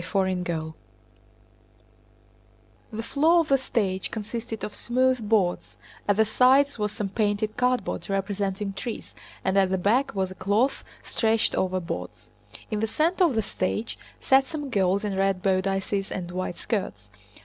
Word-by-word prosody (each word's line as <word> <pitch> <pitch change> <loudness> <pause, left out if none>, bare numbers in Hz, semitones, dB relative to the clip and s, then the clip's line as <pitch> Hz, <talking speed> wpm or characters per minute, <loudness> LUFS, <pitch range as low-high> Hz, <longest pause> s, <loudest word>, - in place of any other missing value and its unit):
CHAPTER 195 +1 +1
IX 170 -4 -2 2.2
The 225 +1 -4
floor 320 +8 +4
of 320 - -5
the 275 -1 +4
stage 200 -7 -1
consisted 225 0 -5
of 210 - -4
smooth 255 -2 +1
boards, 195 -6 +1 0.3
at 205 - +4
the 220 +1 +4
sides 260 +4 +4
was 210 0 0
some 210 -2 -3
painted 210 +1 0
cardboard 250 -3 0
representing 195 0 -2
trees, 225 +3 -6 0.3
and 190 - +1
at 190 -1 +3
the 190 - +1
back 230 +8 +1
was 190 -1 -1
a - - -5
cloth 205 +8 +1 0.2
stretched 225 0 +1
over 185 0 0
boards. 170 0 -7 0.4
In 215 - 0
the 220 - 0
center 340 - +2
of 295 -8 +1
the 220 - +1
stage 200 +3 -3 0.2
sat 270 0 +4
some 295 -3 -5
girls 195 0 +2
in 200 -2 -2
red 195 -1 +1
bodices 195 +1 0
and 175 -2 -4
white 185 -1 -3
skirts. 105 - -3
205 Hz, 155 wpm, -26 LUFS, 190-240 Hz, 2.2 s, floor